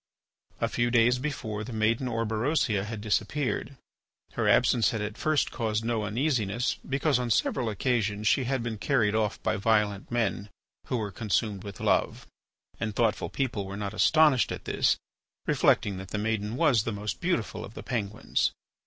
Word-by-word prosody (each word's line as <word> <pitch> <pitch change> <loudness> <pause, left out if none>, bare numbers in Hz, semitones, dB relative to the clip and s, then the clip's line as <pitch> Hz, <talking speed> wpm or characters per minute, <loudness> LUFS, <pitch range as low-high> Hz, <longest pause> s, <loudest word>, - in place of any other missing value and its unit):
A - - +1
few 120 0 0
days 120 +1 +4
before, 120 -7 -3
the 125 - -7
maiden 110 +4 +1
Orberosia 115 -1 0
had 110 -1 -6
disappeared. 135 +5 -1 0.6
Her - - +1
absence 120 -3 +4
had 110 - -2
at 105 0 -4
first 155 -1 +1
caused 110 -2 -1
no 115 -2 0
uneasiness 120 -1 0
because 135 0 +2
on 125 -1 -2
several 120 +1 +1
occasions 105 -2 0
she 130 - +3
had 130 -1 -1
been 110 -3 -4
carried 110 -3 +2
off 110 -1 0
by 110 - +1
violent 105 -2 +1
men 110 -4 -1 0.4
who 125 - 0
were 105 -3 -3
consumed 105 -1 -1
with 100 -2 -8
love. - - +1 0.5
And 110 -2 -3
thoughtful 115 -3 +1
people 115 -8 -2
were 100 +1 -6
not 100 0 -4
astonished 150 +2 +4
at - - -6
this, - - +2 0.5
reflecting 100 -2 +2
that 95 0 -7
the 105 - -4
maiden 110 +1 -1
was 135 -7 +4
the 115 - -3
most 105 -1 -4
beautiful 175 - -1
of 105 - -10
the - - -7
Penguins. 110 -3 -1
110 Hz, 170 wpm, -28 LUFS, 105-125 Hz, 0.6 s, days